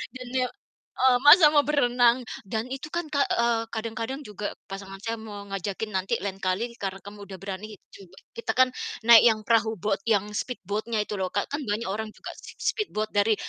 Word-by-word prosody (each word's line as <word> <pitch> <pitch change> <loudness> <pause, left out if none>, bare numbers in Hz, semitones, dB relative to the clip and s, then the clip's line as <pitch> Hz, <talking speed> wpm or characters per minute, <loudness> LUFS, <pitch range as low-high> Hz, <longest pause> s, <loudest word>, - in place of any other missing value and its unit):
Dan, 255 -1 -8
ya, 255 -1 +2 0.5
eee, 255 -1 +5
masak 300 +1 +10
mau 290 - +6
berenang. 245 -4 +3 0.2
Dan 220 +3 -2
itu 270 +3 -5
kan, 345 -1 -2
Kak, 285 -2 +2
eee, 235 -1 +2
kadang-kadang 230 +4 -4
juga 210 0 -4 0.2
pasangan 195 0 -8
saya 230 0 -2
mau 210 -2 -8
ngajakin, 195 +2 -4
"Nanti 190 +5 0
lain 195 -1 -3
kali 210 +6 -1
karena 195 -1 -4
kamu 205 0 -10
udah 190 -1 -8
berani 200 +2 -6 0.2
coba" 190 -1 -15 0.2
kita 230 - -1
kan 255 0 +7 0.4
naik 235 -2 +10
yang 220 -2 +3
perahu 225 -1 +3
boat, 200 +1 0
yang 205 -3 +3
speed 250 +3 -3
boat-nya 215 +2 -1
itu 210 - -5
loh, 185 - -1
Kak, 205 - 0
kan 290 - -2
banyak 220 0 -2
orang 215 +2 -3
juga - - -8
si - - -11
si - - +1
speed 425 -2 -2
boat 215 0 0
dari 210 +1 +4
220 Hz, 205 wpm, -26 LUFS, 200-245 Hz, 0.5 s, masak